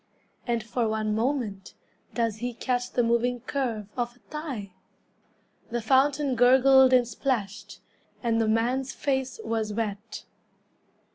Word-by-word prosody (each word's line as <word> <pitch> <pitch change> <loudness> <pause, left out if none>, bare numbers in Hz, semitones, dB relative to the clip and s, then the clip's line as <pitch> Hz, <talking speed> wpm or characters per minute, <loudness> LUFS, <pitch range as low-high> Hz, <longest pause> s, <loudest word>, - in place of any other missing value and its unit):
And 235 -2 0
for 230 0 -1
one 215 -1 -1
moment 220 -4 -2 0.4
Does 230 -3 0
he 245 +1 -4
catch 245 0 -1
the 245 - +1
moving 235 +1 +1
curve 240 -6 -3
Of 240 -1 -3
a - - -25
thigh? 270 - -5 1.0
The 240 0 -1
fountain 270 +4 +2
gurgled 260 +2 +6
and 250 -2 +4
splashed, 220 -4 -3 0.4
And 230 -1 +2
the 225 - +1
man's 245 +4 0
face 265 - -2
was 220 - -2
wet. 210 0 -4
240 Hz, 130 wpm, -27 LUFS, 220-260 Hz, 1.0 s, gurgled